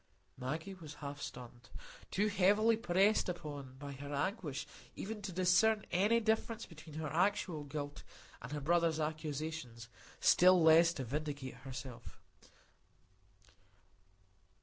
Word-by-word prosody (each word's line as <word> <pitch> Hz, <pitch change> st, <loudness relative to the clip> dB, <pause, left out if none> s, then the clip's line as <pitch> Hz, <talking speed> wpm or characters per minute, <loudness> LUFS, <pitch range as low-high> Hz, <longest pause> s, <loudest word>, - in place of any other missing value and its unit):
Maggie 155 Hz, +9 st, -4 dB
was 160 Hz, -5 st, -10 dB
half 140 Hz, -1 st, -7 dB
stunned,—too 160 Hz, -, -6 dB
heavily 210 Hz, +3 st, +4 dB
pressed 195 Hz, -1 st, +2 dB
upon 145 Hz, -6 st, -6 dB
by 145 Hz, 0 st, -7 dB
her 140 Hz, +1 st, -8 dB
anguish 150 Hz, -, -2 dB, 0.3 s
even 210 Hz, +1 st, -5 dB
to 195 Hz, -1 st, -5 dB
discern 185 Hz, +5 st, +3 dB
any 205 Hz, +6 st, +3 dB
difference 225 Hz, 0 st, 0 dB
between 155 Hz, -2 st, -12 dB
her 155 Hz, -2 st, -4 dB
actual 175 Hz, -3 st, +1 dB
guilt 145 Hz, 0 st, -5 dB, 0.4 s
and -, -, -8 dB
her 150 Hz, 0 st, -3 dB
brother's 165 Hz, +1 st, +2 dB
accusations, 155 Hz, -6 st, -4 dB, 0.3 s
still 185 Hz, +1 st, +6 dB
less 165 Hz, +1 st, +7 dB
to 135 Hz, -, -4 dB
vindicate 140 Hz, 0 st, -4 dB
herself. 130 Hz, -2 st, -8 dB
160 Hz, 115 wpm, -35 LUFS, 140-190 Hz, 0.4 s, less